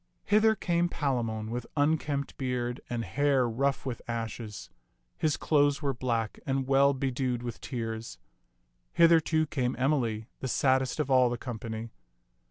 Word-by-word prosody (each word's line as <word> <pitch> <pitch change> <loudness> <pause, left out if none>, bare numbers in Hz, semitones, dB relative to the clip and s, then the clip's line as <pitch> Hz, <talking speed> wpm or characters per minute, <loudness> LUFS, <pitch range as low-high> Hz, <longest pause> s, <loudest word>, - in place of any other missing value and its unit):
Hither 215 +1 +4
came 175 -3 +1
Palamon 115 -8 -2
with 120 0 -4
unkempt 145 -1 0
beard 125 -2 -2
and 115 -2 -2
hair 135 +5 +2
rough 135 +5 0
with 125 -3 -4
ashes. 110 -5 -5 0.5
His 155 -2 0
clothes 145 0 +2
were 140 -1 +1
black 115 -3 -2
and 135 -1 -1
well 140 +1 +4
bedewed 130 -2 -1
with 120 -2 -6
tears. 115 -3 -5 0.8
Hither, 165 0 +6
too, 155 0 +1
came 130 -4 -1
Emily, 125 -5 0
the 130 - -3
saddest 130 +2 +1
of 145 -3 0
all 130 -1 +5
the 120 - -2
company. 115 -2 -6
130 Hz, 145 wpm, -29 LUFS, 115-145 Hz, 0.8 s, Hither